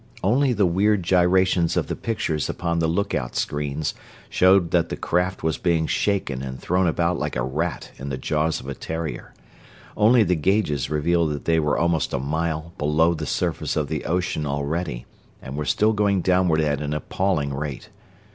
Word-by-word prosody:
Only 130 +8 +3
the 105 -4 +2
weird 95 +3 +2
gyrations 90 -1 +3
of - - +1
the - - -4
pictures 80 -9 -2
upon 85 -1 -1
the 80 - +1
lookout 80 - -1
screens 75 +1 -2 0.4
showed 95 -2 +4
that 85 -2 +2
the - - -4
craft 90 +2 -1
was 80 0 0
being 85 -2 +1
shaken 80 -8 -1
and 65 -1 -6
thrown 90 +1 +1
about 85 +1 0
like 75 0 -3
a - - 0
rat 75 +6 -3
in 70 +1 -6
the 65 - -3
jaws 80 +4 0
of - - -11
a 70 - -3
terrier; 80 +3 -5 0.6
only 115 +2 +5
the 90 - +1
gauges 80 -4 0
revealed 80 +2 +1
that 70 - -7
they 80 -1 +3
were 75 -2 +1
almost 85 -2 0
a - - 0
mile 80 +3 -2
below 75 +3 +3
the 80 - -5
surface - - -1
of 75 -2 -1
the 80 -2 -3
ocean 85 -2 -1
already, 70 -1 -3 0.3
and 65 - -8
were 75 0 -3
still 110 +8 +2
going 100 -2 +2
downward 90 -3 +2
at 75 -2 0
an 75 0 -2
appalling 75 -2 -1
rate. 70 -1 -5
80 Hz, 185 wpm, -23 LUFS, 75-90 Hz, 0.6 s, only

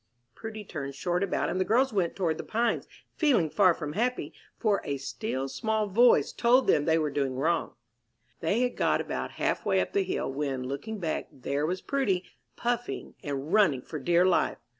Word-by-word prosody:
Prudy 220 - -7
turned 140 -8 -6
short 175 +4 -1
about, 200 - 0
and 185 - -1
the - - +4
girls 250 +5 +2
went 180 -5 0
toward 170 -4 -1
the - - -3
Pines, 230 +1 0 0.3
feeling 245 - +3
far 190 -3 +5
from 150 -2 -5
happy, 245 +6 -1 0.2
for 210 -4 +1
a 140 - -2
"still, 135 0 -3
small 215 +11 -1
voice" 235 +5 +4
told 250 +2 +4
them 145 - +3
they 160 0 +3
were 155 -2 0
doing 135 -2 -1
wrong. 165 +6 0 0.6
They 200 +8 +1
had 250 -1 0
got - - +2
about - - -4
half - - -1
way - - +2
up - - -2
the 400 - +3
hill, 135 - -2
when, 135 -2 -2
looking 140 +13 -5
back, 165 -5 -2
there 140 +3 -2
was 185 +2 -3
Prudy, 205 -10 0 0.3
puffing 240 0 -3
and 145 +3 -4
running 165 -12 +4
for 155 - -6
dear 175 +5 +3
life. 185 - +2
180 Hz, 190 wpm, -28 LUFS, 145-220 Hz, 0.6 s, far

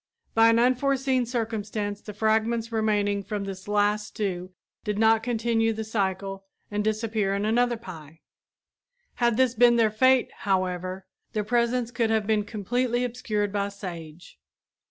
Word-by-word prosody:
By 225 0 +6
an 230 - +4
unforeseen 255 +1 +2
circumstance 215 -3 -3
the 210 - -8
fragments 220 +2 0
remaining 205 -2 +1
from 205 0 -4
this 195 0 -7
last 210 0 +1
stew 185 -3 -4 0.3
did 210 -1 -2
not 220 0 +4
continue 225 -1 +1
the 220 0 -4
cycle 195 -2 -2 0.3
and 210 0 -1
disappear 215 -2 0
in 200 +1 -1
another 240 +2 +2
pie. 165 -7 -11 1.0
Had 235 -2 +3
this 260 -2 +3
been 240 0 +5
their 225 -2 +3
fate, 260 +3 +3
however, 185 -1 -1 0.3
their 215 - 0
presence 235 +2 0
could 235 -2 0
have 220 -2 +1
been 210 -1 +1
completely 240 +4 -1
obscured 215 -5 -2
by 200 -1 0
sage. 175 -5 -9
215 Hz, 145 wpm, -26 LUFS, 200-235 Hz, 1.0 s, By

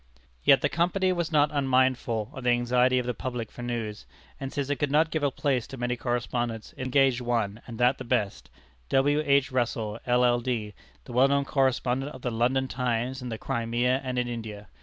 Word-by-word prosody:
Yet 135 -2 +6
the - - +3
Company 185 +3 +1
was 170 -2 -2
not 150 -1 +3
unmindful 130 -5 +1
of 130 -4 -8
the 125 - +2
anxiety 125 +1 +3
of 125 - 0
the 125 - -1
public 120 -1 -5
for - - -10
news, 115 -3 -4 0.3
and 135 0 -5
since 140 -2 -2
it 145 - 0
could 145 +2 0
not 155 +3 +3
give 155 - -1
a 145 - +2
place 130 -3 -1
to 135 - -9
many 125 0 -1
correspondents, 120 -2 -3
it - - -8
engaged 130 -1 +3
one, 115 -3 -1
and 115 -2 -7
that 125 +3 +3
the - - -5
best 115 -5 -1 0.4
W. 145 +3 +3
H. 140 -2 +3
Russell, 115 -3 -1
LL.D., 120 -3 +1 0.3
the 125 - -9
well 130 +3 +5
known 140 0 +1
correspondent 135 0 0
of 130 - -12
the 125 - -1
London 125 +4 +1
Times 125 +1 -2
in 125 - -5
the 110 - -4
Crimea 120 +4 0
and 130 -1 -3
in 125 0 0
India. 110 -4 -6
125 Hz, 200 wpm, -27 LUFS, 120-135 Hz, 0.4 s, Yet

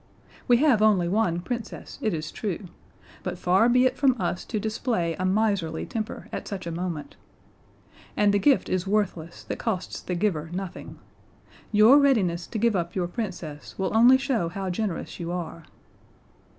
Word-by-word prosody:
We 245 -2 +6
have 260 -5 +4
only 205 -5 +4
one 175 -3 +1
Princess, 235 +4 -6
it 220 -5 +1
is 155 -2 -4
true; 200 -2 -4 0.6
but - - -4
far 190 +6 +3
be 250 +1 +4
it 255 0 +2
from 260 -4 +3
us 175 0 -2
to 215 - -2
display 215 -5 -1
a 185 - -3
miserly 190 -5 0
temper 220 -2 -5
at - - -5
such 195 -3 -5
a 170 - -4
moment. 170 -3 -5 1.0
And 205 -1 +4
the 205 - +3
gift 275 +5 +3
is 185 +1 -1
worthless 185 -5 -1
that - - -5
costs 190 -6 -3
the 180 - -3
giver 170 -5 -1
nothing. 190 0 -6 0.7
Your 220 +6 +7
readiness 195 -12 +2
to - - -5
give 230 0 +2
up 175 -1 -2
your 180 -2 0
Princess 175 -8 -6
will 190 +2 -1
only 245 +4 +7
show 260 - -1
how 190 +1 -4
generous 190 -2 -3
you 170 0 -4
are." 170 -2 -5
195 Hz, 170 wpm, -26 LUFS, 175-225 Hz, 1.0 s, Your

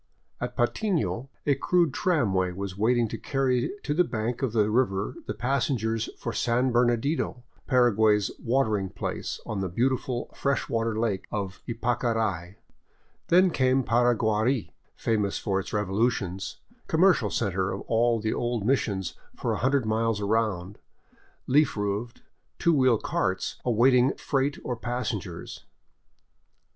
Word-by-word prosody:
At - - -5
Patmo 165 - 0 0.2
a 145 - +4
crude 170 +2 +2
tramway 100 - +1
was 95 0 -5
waiting 115 +3 +2
to - - -5
carry 130 -3 0
to 145 - -1
the 180 +4 +4
bank 115 -3 -3
of 130 -4 0
the 105 -1 +2
river 105 -5 +1
the 105 - -3
passengers 115 -2 0
for 115 - -4
San 125 +2 +1
Bernadino, 120 +2 +1 0.2
Paraguay's 110 -5 +3
" - - -32
watering 110 -6 +1
place," 95 - -4
on 105 - -3
the 95 - -2
beautiful 125 +4 -1
fresh 140 -1 0
water 115 -1 -1
lake 110 -5 -1
of 95 -3 -4
Ypacarai. 115 -6 -1 0.7
Then 180 +1 +5
came 130 -2 +2
Paraguari, 120 0 +1 0.2
famous 105 -3 0
for 95 -1 -1
its 95 - -6
revolutions, 100 -2 -1 0.3
commercial 165 - +3
center 95 -4 -1
of 100 - -4
all 115 0 +2
the 110 0 -1
old 120 -3 -2
missions 100 -8 0 0.2
for - - -1
a - - -2
hundred 135 -1 +2
miles 110 0 0
around, 100 -3 -1 0.7
leaf 145 -2 +3
roofed, 105 +4 -3 0.3
two 170 - +3
wheel 130 -5 +4
carts 95 -2 -2
awaiting 125 +2 +4
freight 140 0 -1
or 125 - -2
passengers. 115 -8 -4
115 Hz, 135 wpm, -27 LUFS, 105-130 Hz, 0.7 s, Then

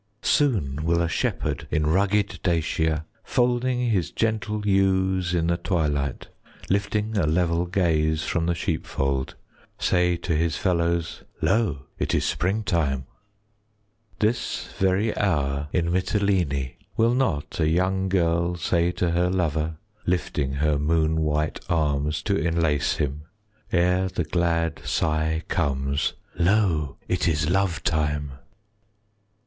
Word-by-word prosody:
Soon 80 - +1
will 85 +1 +2
a 85 - +1
shepherd 80 - -2
In 75 0 +1
rugged 95 +3 +1
Dacia, 80 -2 0 0.2
Folding 125 0 +1
his 90 -7 +1
gentle 110 -2 -1
Ewes 95 -2 +2
in 85 -1 +1
the 85 +1 +1
twilight, 75 -6 -1 0.4
20 - - 0
Lifting 105 +2 -1
a 80 - +2
level 85 +1 +1
Gaze 80 -4 +1
from 85 -1 -1
the 85 - +1
sheepfold, 70 -5 -2 0.4
Say 90 -1 +2
to 85 -1 -2
his 80 -1 0
fellows, 85 -2 0 0.2
"Lo, 85 - +1
it - - 0
is - - +1
springtime." 85 -8 0 1.1
This 110 +2 -1
very 95 +3 +2
hour 75 -7 0
25 - - -5
In 85 - -1
Mitylene, 90 -8 0 0.2
Will 115 +2 +4
not 125 - -1
a 80 - +3
young 95 +3 +1
girl 85 -1 +1
Say 85 0 +1
to 90 -1 0
her 90 +1 +2
lover, 80 -3 -1 0.3
Lifting 85 -6 0
her 75 +1 +1
moon 80 +1 +1
white 75 0 0
Arms 75 -2 0
to 100 - +1
enlace 85 -5 +1
him, 75 +1 -3 0.4
30 85 -1 +3
Ere 90 +1 +2
the 90 - -2
glad 85 0 0
sigh 80 +1 0
comes, 70 -4 0 0.3
"Lo, 85 -6 +2
it 90 0 0
is 75 0 +1
lovetime!" 80 -6 0
85 Hz, 130 wpm, -25 LUFS, 75-95 Hz, 1.1 s, Will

